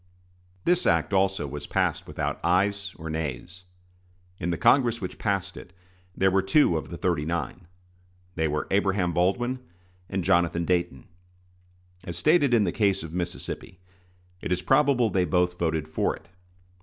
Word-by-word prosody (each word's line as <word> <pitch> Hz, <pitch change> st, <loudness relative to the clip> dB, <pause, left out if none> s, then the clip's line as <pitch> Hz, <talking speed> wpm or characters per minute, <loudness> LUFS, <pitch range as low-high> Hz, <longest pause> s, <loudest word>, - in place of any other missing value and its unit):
This 180 Hz, 0 st, +3 dB
act 85 Hz, +3 st, +2 dB
also 95 Hz, -3 st, +2 dB
was 75 Hz, +1 st, -6 dB
passed -, -, 0 dB
without -, -, -3 dB
ayes 100 Hz, +3 st, +1 dB
or 80 Hz, -, -8 dB
nays. 80 Hz, +3 st, -5 dB, 0.7 s
In 85 Hz, -, -2 dB
the 85 Hz, -, -1 dB
Congress 120 Hz, -, +3 dB
which 90 Hz, -2 st, -6 dB
passed 95 Hz, -2 st, -1 dB
it 90 Hz, -, -11 dB, 0.4 s
there 95 Hz, 0 st, +3 dB
were 95 Hz, +1 st, +3 dB
two 95 Hz, -, +3 dB
of 80 Hz, -, -3 dB
the 85 Hz, -, -6 dB
"thirty 85 Hz, -5 st, 0 dB
nine." 85 Hz, +2 st, -4 dB, 0.7 s
They 80 Hz, -2 st, 0 dB
were 75 Hz, 0 st, -2 dB
Abraham 95 Hz, -3 st, +1 dB
Baldwin 120 Hz, +9 st, +1 dB, 0.5 s
and 95 Hz, -2 st, -2 dB
Jonathan 85 Hz, 0 st, +2 dB
Dayton. 85 Hz, -7 st, -1 dB, 1.0 s
As 85 Hz, -2 st, -5 dB
stated 150 Hz, -, +3 dB
in 115 Hz, -3 st, +4 dB
the 90 Hz, -, 0 dB
case 100 Hz, -3 st, +1 dB
of 80 Hz, 0 st, -8 dB
Mississippi, 90 Hz, 0 st, -5 dB, 0.6 s
it -, -, -4 dB
is 90 Hz, 0 st, 0 dB
probable 135 Hz, -1 st, +3 dB
they 95 Hz, -, +2 dB
both 90 Hz, +1 st, +1 dB
voted 80 Hz, -2 st, -1 dB
for 80 Hz, -, -1 dB
it. 80 Hz, -, -18 dB
90 Hz, 155 wpm, -26 LUFS, 85-100 Hz, 1.0 s, in